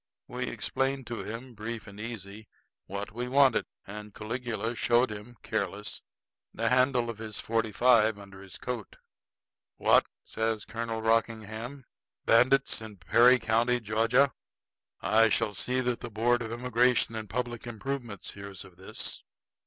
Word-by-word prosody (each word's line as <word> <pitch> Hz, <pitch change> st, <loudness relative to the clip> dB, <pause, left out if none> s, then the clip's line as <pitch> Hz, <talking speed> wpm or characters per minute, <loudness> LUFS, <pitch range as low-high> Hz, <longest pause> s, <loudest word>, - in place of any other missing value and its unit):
We -, -, -3 dB
explained 135 Hz, 0 st, -1 dB
to 120 Hz, 0 st, -4 dB
him, 120 Hz, +3 st, -7 dB
brief 110 Hz, +1 st, -5 dB
and 100 Hz, 0 st, -11 dB
easy, 110 Hz, -1 st, -7 dB, 0.4 s
what 100 Hz, +1 st, -5 dB
we 120 Hz, +3 st, -4 dB
wanted; 135 Hz, -1 st, +4 dB, 0.2 s
and 105 Hz, +1 st, -9 dB
Caligula 115 Hz, +1 st, -3 dB
showed 120 Hz, 0 st, +3 dB
him, 105 Hz, +3 st, -9 dB
careless, -, -, -3 dB, 0.5 s
the -, -, 0 dB
handle 125 Hz, -1 st, +3 dB
of 110 Hz, -, -12 dB
his 110 Hz, -1 st, -5 dB
forty 115 Hz, -1 st, 0 dB
five 110 Hz, -1 st, +4 dB
under 100 Hz, -1 st, -12 dB
his 95 Hz, -1 st, -9 dB
coat. 120 Hz, -4 st, -5 dB, 0.8 s
"What?" -, -, +5 dB, 0.2 s
says 110 Hz, -2 st, -1 dB
Colonel 115 Hz, 0 st, -4 dB
Rockingham. 115 Hz, +3 st, -1 dB, 0.4 s
"Bandits 130 Hz, +2 st, +4 dB
in 110 Hz, -2 st, -9 dB
Perry 120 Hz, +8 st, +6 dB
County, 115 Hz, +2 st, +2 dB
Georgia! 115 Hz, +5 st, +3 dB, 0.7 s
I 110 Hz, +1 st, +5 dB
shall 105 Hz, 0 st, +1 dB
see 125 Hz, +5 st, 0 dB
that 125 Hz, -1 st, 0 dB
the 120 Hz, -, -5 dB
board 120 Hz, +3 st, +2 dB
of 115 Hz, -1 st, -4 dB
immigration 120 Hz, 0 st, +2 dB
and 110 Hz, -2 st, -5 dB
public 120 Hz, +1 st, -3 dB
improvements 120 Hz, -3 st, -5 dB
hears 100 Hz, -1 st, -9 dB
of 90 Hz, -2 st, -17 dB
this!" 95 Hz, -, -5 dB
115 Hz, 145 wpm, -29 LUFS, 110-125 Hz, 0.8 s, Perry